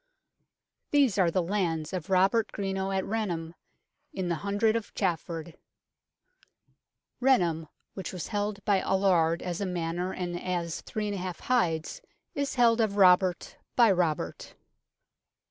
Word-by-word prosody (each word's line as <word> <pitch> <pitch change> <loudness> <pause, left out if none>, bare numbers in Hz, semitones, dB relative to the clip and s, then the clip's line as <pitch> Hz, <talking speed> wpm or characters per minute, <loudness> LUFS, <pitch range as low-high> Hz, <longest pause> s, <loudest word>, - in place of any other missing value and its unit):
These 275 -9 +3
are 180 -3 +4
the 180 +1 0
lands 170 -4 -1
of 180 -2 -4
Robert 195 +4 +3
Greno 195 -1 -2
at 190 -1 -1
Rainham, 175 -7 -3 0.6
in 185 -2 -3
the 170 - 0
Hundred 205 +2 +1
of 230 -2 -4
Chafford 170 -3 -2 0.8
" - - -40
Renaham, 175 -12 +2 0.3
which 190 - -6
was 180 -3 -6
held 205 -1 -3
by 200 -2 +3
Aluard 175 -4 +2
as 180 +1 -3
a - - 0
manor 175 +1 -2
and 175 -2 -4
as 175 -2 -3
3j 210 -2 -3 0.2
hides, 205 - 0 0.3
is 280 -1 -2
held 235 -2 +4
of 215 -3 +1
R[obert] 185 -2 +3 0.2
by 235 -4 +6
Robert. 170 -5 -1
190 Hz, 130 wpm, -28 LUFS, 170-205 Hz, 0.8 s, by